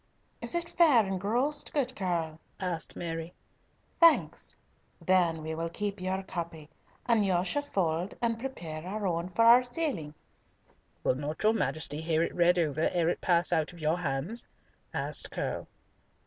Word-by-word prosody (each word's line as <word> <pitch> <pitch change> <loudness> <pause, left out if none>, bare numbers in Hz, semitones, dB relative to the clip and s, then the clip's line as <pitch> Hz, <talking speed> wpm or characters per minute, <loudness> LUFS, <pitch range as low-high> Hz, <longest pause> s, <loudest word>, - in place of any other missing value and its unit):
"Is - - -2
it 340 0 -1
fair 295 -12 +5
engrossed, 230 +10 -1
good 260 -3 0
Curll?" 170 -5 -2 0.2
asked 180 -4 -3
Mary. 165 0 -5 0.6
"Thanks. 335 -2 +4 0.4
Then 170 -4 +2
will 160 0 -4
we 165 0 -2
keep 200 +2 -4
your 190 +1 -2
copy, 165 -4 -6 0.3
and 230 -3 +3
you 185 -2 +1
shall 290 +10 0
fold 180 - -1
and 230 -1 0
prepare 170 -12 -6
our 205 +3 -4
own 170 -1 -1
for 230 +5 +2
our 240 +2 +8
sealing." 245 - -3 0.9
"Will - - +3
not 145 +6 -5
your 215 +1 +5
Majesty 155 -7 -1
hear 160 0 +1
it - - -2
read 175 +1 +4
over 155 -2 +1
ere 170 -2 +1
it - - -2
pass 175 -1 +3
out 160 +1 0
of 170 - -13
your 160 +2 0
hands?" 160 - -1 0.4
asked - - 0
Curll. - - -4
180 Hz, 160 wpm, -29 LUFS, 165-225 Hz, 0.9 s, our